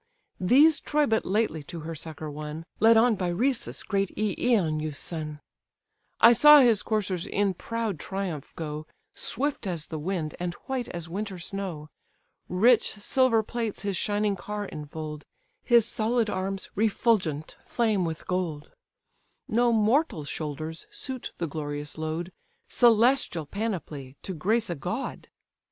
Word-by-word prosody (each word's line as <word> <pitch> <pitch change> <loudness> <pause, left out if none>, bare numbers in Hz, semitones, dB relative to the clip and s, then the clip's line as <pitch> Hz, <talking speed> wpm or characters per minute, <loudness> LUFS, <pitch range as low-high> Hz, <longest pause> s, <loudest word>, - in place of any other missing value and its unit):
These 285 - +5
Troy 300 0 +1
but 220 -4 0
lately 195 -5 0
to 165 +2 -7
her 165 +2 -5
succour 155 -1 -6
won, 150 +2 -6
Led 225 +1 +6
on 235 +1 +5
by 185 -2 -2
Rhesus, 235 +9 0
great 195 -2 0
Eioneus' 180 - +1
son: 155 -3 -4 0.8
I 235 - +8
saw 295 +5 +9
his 235 -5 +4
coursers 195 -5 -1
in 200 -1 +1
proud 225 -2 -3
triumph 190 -6 -4
go, 155 -1 -5 0.3
Swift 275 -3 -2
as 170 -4 -3
the 160 - -6
wind, 160 -2 -2
and 175 -1 -3
white 260 -2 -2
as 170 -2 -5
winter 195 +2 -4
snow; 175 -4 -5 0.6
Rich 225 +6 +4
silver 225 +2 +2
plates 225 -2 -4
his 200 -1 -1
shining 205 +2 0
car 210 +2 -5
infold; 150 -1 -7 0.4
His 235 -3 +5
solid 230 -1 +1
arms, 190 +1 -3
refulgent, 200 -8 +1
flame 220 -5 0
with 160 -2 -4
gold; 170 -5 -3 0.8
No 240 +2 +3
mortal 225 - +2
shoulders 155 +2 -5
suit 260 -2 -5
the 170 - -1
glorious 145 -1 -5
load, 160 +3 -3 0.4
Celestial 235 - +3
panoply, 160 - -4
to 190 - -4
grace 215 +7 +1
a - - +1
god! 220 - -4
195 Hz, 140 wpm, -27 LUFS, 160-225 Hz, 0.8 s, saw